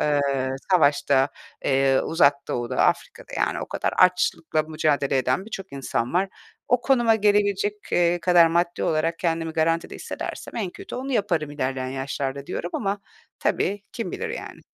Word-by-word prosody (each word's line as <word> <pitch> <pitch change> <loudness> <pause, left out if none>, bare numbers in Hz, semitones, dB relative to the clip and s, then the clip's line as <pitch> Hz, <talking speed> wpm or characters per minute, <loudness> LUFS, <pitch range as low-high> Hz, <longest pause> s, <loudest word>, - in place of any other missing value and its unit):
eee, 145 -1 +2 0.5
savaşta, 140 -5 +4 0.4
eee, 135 0 +3
Uzak 145 -4 +4
Doğu'da, 120 +1 -2
Afrika'da, - - 0
yani, - - 0
o - - -4
kadar - - -2
açlıkla 180 -3 +3
mücadele 150 -3 +1
eden 130 +8 0
birçok 195 -3 -7
insan 130 -2 -2
var. 190 +2 +2 0.4
O 250 - +3
konuma 240 -3 +3
gelebilecek, 205 -1 +2 0.2
eee, 175 0 +3
kadar 175 -1 +6
maddi 170 +1 0
olarak 165 +1 0
kendimi 165 -2 -1
garantide 165 +1 0
hissedersem - - -6
en 200 -6 -2
kötü - - -9
onu 265 +2 -4
yaparım 175 - 0
ilerleyen 130 -2 -2
yaşlarda 135 +1 -4
diyorum 175 - -4
ama 200 -1 -2 0.4
tabii 205 0 0
kim 230 - -4
bilir, 465 - -3
yani. 460 - -7
165 Hz, 150 wpm, -24 LUFS, 140-195 Hz, 0.5 s, kadar